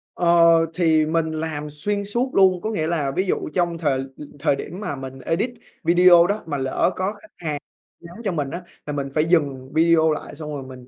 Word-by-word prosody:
Ờ, 170 -1 +5
thì 160 -3 +3
mình 160 0 0
làm 155 -1 -4
xuyên 200 +8 -2
suốt 240 +6 -1
luôn. 185 -2 +4
Có 220 - -2
nghĩa 160 -7 -1
là, 150 -5 -1
ví 185 +8 -1
dụ - - -1
trong 175 -2 0
thời 145 -5 0
l 135 - -2 0.4
thời 140 - +2
điểm 170 +6 -7
mà 180 -9 -4
mình 135 0 -8
edit 180 - -1 0.3
video 175 0 +6
đó 205 +2 -2
mà 145 -3 -3
lỡ 135 +6 0
có 190 +2 -1
khách 325 +8 -17 0.5
hàng - - -
nhắn 170 +1 -12
cho 200 - 0
mình 145 -5 -2
á, 175 - -5 0.2
là 150 - -4
mình 140 -1 -3
phải 155 +1 +2
dừng 140 -6 0
video 160 0 +4
lại 150 - -5
xong 150 0 -7
rồi 140 - -5
mình 130 -1 -12
165 Hz, 220 wpm, -22 LUFS, 145-180 Hz, 0.5 s, video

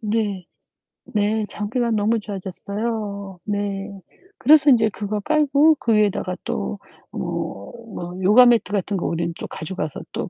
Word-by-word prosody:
네. 210 -4 -1 0.7
네 210 +1 +1
장비가 230 +3 -2
너무 220 +1 +2
좋아졌어요. 200 0 -5
네. 200 -1 -2 0.5
그래서 295 +2 +6
인제 225 -4 +5
그거 210 +1 -3
깔고 300 +2 +4
그 230 - +1
위에다가 205 -3 +1
또 65 0 -3 0.3
뭐, 100 +1 -5 0.2
뭐 175 0 -6
요가 215 +7 +7
매트 235 -5 +3
같은 200 0 -1
거 175 - -3
우리는 170 0 -2
또 - - -5
가져가서 160 -3 -5
또 - - -3
205 Hz, 270 characters per minute, -22 LUFS, 195-230 Hz, 0.7 s, 요가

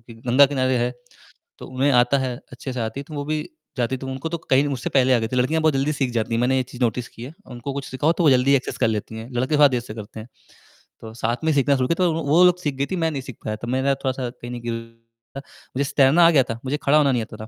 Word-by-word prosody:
कि 115 0 -14
गंगा 135 +4 +6
किनारे 130 -2 0
है, 120 +1 0 0.7
तो - - -9
उन्हें 130 +2 0
आता 125 +3 +2
है, 130 -2 -2 0.2
अच्छे 125 +2 -6
से 125 - -4
आती 115 +4 -3
थी। - - -8
तो 155 - -9
वो 145 - -3
भी 155 +1 -2 0.4
जाती 120 +2 0
थी, - - -12
तो 135 - -6
उनको 135 +4 -4
तो 170 - -4
कहीं 135 +2 +4
मुझसे 135 -3 -3
पहले 130 -1 +3
आ - - +4
गए 110 - -2
थे। - - -1
लड़कियाँ 145 +6 +1
बहुत 155 -2 +3
जल्दी 135 +3 0
सीख 135 -4 -1
जाती 115 0 -1
हैं, 115 - +1
मैंने 130 +2 +2
ये 130 - +2
चीज़ 125 - -10
नोटिस 120 +1 0
की 115 - -13
है। 135 - -9 0.2
उनको 125 +3 -6
कुछ 140 -1 -5
सिखाओ 145 +5 +1
तो 175 - +2
वो 150 - +6
जल्दी 130 +2 +4
एक्सेस 130 - -4
कर - - +2
लेती 110 0 -3
हैं, 110 +3 -8
लड़के 130 +5 0
थोड़ा 145 -1 +7
देर 125 - 0
से 115 -2 -9
करते 110 0 -9
हैं। 110 - -11 0.7
तो 110 -1 -9
साथ 120 +6 -1
में 160 - +3
सीखना 140 0 +3
शुरू 130 -1 0
किया 170 +5 0
तो 170 - +2
वो, 165 +1 -3
वो 155 +5 +4
लोग 180 0 +4
सीख 145 -5 -2
गई 140 +1 -1
थी, - - 0
मैं 165 -2 0
नहीं 140 -3 -4
सीख 130 -3 -10
पाया, 110 - -2
तो 115 +2 -8
मेरा 130 +2 +1
थोड़ा-सा 130 -2 -3
कहीं 120 0 -10
नहीं 120 -1 -6
गिर 115 -1 -4 0.6
था। - - -5 0.4
मुझे 140 0 0
तैरना 145 +5 +6
आ - - +5
गया 140 -5 +4
था, 115 - -4
मुझे 135 +3 -1
खड़ा 145 +2 +4
होना 145 -2 +4
नहीं 125 -2 0
आता 110 - -11
था - - -14
130 Hz, 305 wpm, -22 LUFS, 120-145 Hz, 0.7 s, थोड़ा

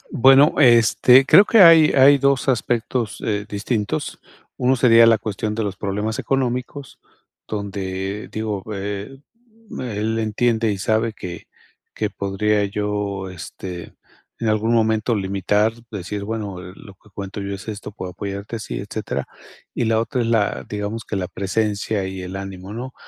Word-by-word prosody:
Bueno, 135 +4 +6
este, 125 +1 +6
creo 200 - +8
que 225 +1 +4
hay 165 -3 +8
hay 140 +1 +6
2 140 -1 +1
aspectos, 120 -2 -1
eh, 105 -2 -2
distintos, 105 +1 -3 0.4
uno 130 +1 +2
sería 115 -2 +6
la 115 -1 +5
cuestión 105 +1 -3
de 110 - -2
los 100 -2 -4
problemas 105 +3 -3
económicos, 135 +1 -3 0.5
donde, 100 -1 -4
digo, 105 -3 -3
eh, 100 +5 -5 0.6
él 110 -2 -2
entiende 110 +1 +1
y 100 - -4
sabe 110 +3 0
que 90 -4 -8 0.5
que 105 - -1
podría 100 +2 0
yo, 100 -1 -3
este, 90 0 -8 0.4
en 115 - -2
algún 110 +2 +1
momento 110 0 +2
limitar, 105 +2 0 0.2
decir: 100 0 -5
"Bueno, 105 -4 -5
eh, 90 0 -10
lo 100 - -13
que 105 +3 -24
cuento 100 +1 -7
yo 100 0 -4
es 95 +3 -10
esto, 105 -1 -6
puedo 95 -2 -7
apoyarte 100 +4 -6
así, 110 - -5
etcétera". 100 +2 -4 0.5
Y - - -1
la 110 0 +2
otra 125 +2 -1
es - - -1
la 110 -3 0
digamos 105 +2 -4
que 105 - -4
la 90 -2 -3
presencia 100 +1 -2
y 95 -1 -6
el 90 +1 -7
ánimo, 95 0 -7
¿no? 125 +4 -7
105 Hz, 155 wpm, -21 LUFS, 100-115 Hz, 0.6 s, creo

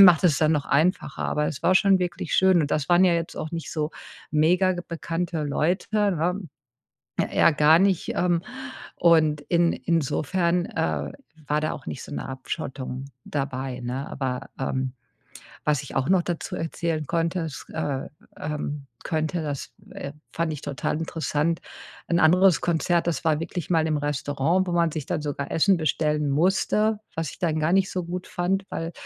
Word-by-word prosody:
macht 180 -5 +9
es 155 -5 +5
dann 155 0 +3
noch 145 -3 0
einfacher, 155 0 +1
aber 150 0 0
es 135 - -4
war 185 - +4
schon 195 0 +5
wirklich 175 0 -2
schön 190 -2 +5
und 145 - -2
das 145 -2 0
waren 175 +2 +6
ja 175 - +4
jetzt 165 0 -2
auch 155 - -4
nicht 165 -1 -4
so 150 -2 -1 0.4
megabekannte 170 0 +1
Leute, 155 +5 0 0.3
ne? 180 +5 0 0.9
Eher 165 - +5
gar 155 +3 +6
nicht, 190 -3 +2
ähm, 175 -2 +2 0.6
und 155 -3 +4
in 170 +2 +2
insofern, 170 +2 0
äh, 75 -3 -2 0.4
war 150 +1 +2
da 155 - -1
auch 135 - -8
nicht - - -5
so - - -10
'ne - - -4
Abschottung 130 -1 -5 0.2
dabei, 135 -2 -3
ne? 125 +3 -4
Aber, 130 -1 -3
ähm, 130 -1 -2 0.7
was 150 -2 +2
ich 140 - -9
auch 130 - +1
noch 185 -2 +4
dazu 170 -1 -4
erzählen 165 -1 -2
konnte 170 +1 0
es, 160 -4 -5
äh, 135 -1 -2 0.3
ähm, 145 -1 -4 0.2
könnte, 160 +1 -1
das, 145 -3 -4 0.2
äh, 140 - -6 0.2
fand 165 -1 -1
ich 150 - -5
total 145 +1 -2
interessant. 160 0 -1 0.5
Ein 170 0 +2
anderes 180 +2 +5
Konzert, 170 0 +1
das 165 - -2
war 155 -1 +2
wirklich 170 0 -4
mal 160 -2 +3
im 155 - +1
Restaurant, 145 +5 0
wo - - -1
man 170 -2 +2
sich 155 -3 -4
dann - - -1
sogar 145 -1 -3
Essen 190 +4 +4
bestellen 150 -2 0
musste, 200 +7 +2 0.2
was 160 -3 -2
ich - - -13
dann 160 -3 +1
gar 155 +2 +1
nicht 195 0 +3
so 180 -1 -2
gut 180 +2 -5
fand, 190 +2 0
weil 165 +1 -4
160 Hz, 175 wpm, -25 LUFS, 145-175 Hz, 0.9 s, macht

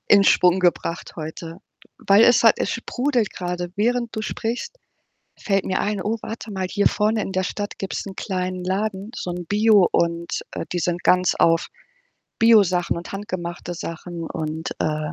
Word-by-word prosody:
in 200 -1 +6
Schwung 180 0 +4
gebracht 175 -2 -1
heute. 165 +2 -7 0.4
Weil 200 +3 +5
es 245 -1 +5
hat 225 - +5
es - - -1
sprudelt 245 -1 -1
grade, 175 -1 -4
während 235 +2 0
du 215 - -2
sprichst, 245 - -4 0.6
fällt 195 -2 0
mir 185 - 0
ein: 205 -2 -1
„Oh, 220 +4 -1
warte 225 -1 -7
mal, 190 -2 -2
hier 205 - +3
vorne 215 +1 +1
in 195 - -4
der 185 0 0
Stadt 205 +2 -4
gibt's 195 - -4
'n 190 - -8
kleinen 185 -2 -3
Laden, 200 +2 -2
so 180 - -4
'n 175 -1 -5
Bio 210 -1 +4
und, 170 0 0
äh, - - -5
die 175 - -1
sind 175 +1 -1
ganz 180 0 +3
auf 165 0 +3 0.7
Biosachen 200 -8 +4
und 170 - -9
handgemachte 180 -3 -5
Sachen 165 0 -6
und, 160 +1 -4
äh 155 +1 -1
185 Hz, 170 wpm, -22 LUFS, 175-210 Hz, 0.7 s, in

